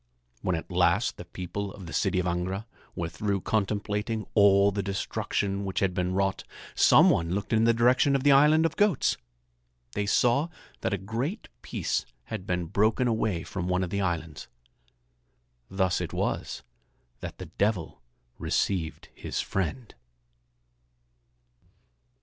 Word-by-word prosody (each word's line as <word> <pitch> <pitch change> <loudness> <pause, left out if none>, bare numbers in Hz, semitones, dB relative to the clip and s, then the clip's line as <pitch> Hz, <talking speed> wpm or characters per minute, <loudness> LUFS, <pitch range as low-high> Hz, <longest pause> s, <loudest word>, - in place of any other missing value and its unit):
When 90 - 0
at 80 - -6
last - - +2
the - - -8
people 100 +2 -5
of 95 -1 -10
the 80 - -8
city - - +1
of 90 - +1
Angra 90 +4 -2 0.3
were 85 - -2
through 100 +3 -2
contemplating 105 +1 -1
all 100 -1 +5
the 100 0 -2
destruction 100 0 -2
which 95 -1 -2
had 95 -2 +1
been 90 0 -1
wrought, 95 0 0 0.3
some - - +6
one 85 +2 0
looked 100 +2 -3
in 110 0 +4
the 115 - +6
direction 125 +4 +4
of 135 - 0
the 145 - +6
island 150 +4 +6
of 165 - 0
goats. 205 -8 +2 0.8
They 100 +9 -2
saw 125 +9 +3 0.3
that 115 - -1
a 100 - 0
great 115 - -4
piece - - -2 0.2
had 105 -4 -6
been 90 -1 -1
broken 110 +8 +2
away 110 -7 0
from 90 -2 -4
one 90 0 +1
of 90 - -4
the 100 - 0
islands. 80 -5 -3 1.2
Thus 95 -2 +1
it - - -4
was - - -2 0.6
that - - -7
the - - -7
Devil 95 - -1 0.4
received 85 -5 -1
his - - -5
friend. 95 - -3
100 Hz, 150 wpm, -27 LUFS, 90-110 Hz, 1.2 s, some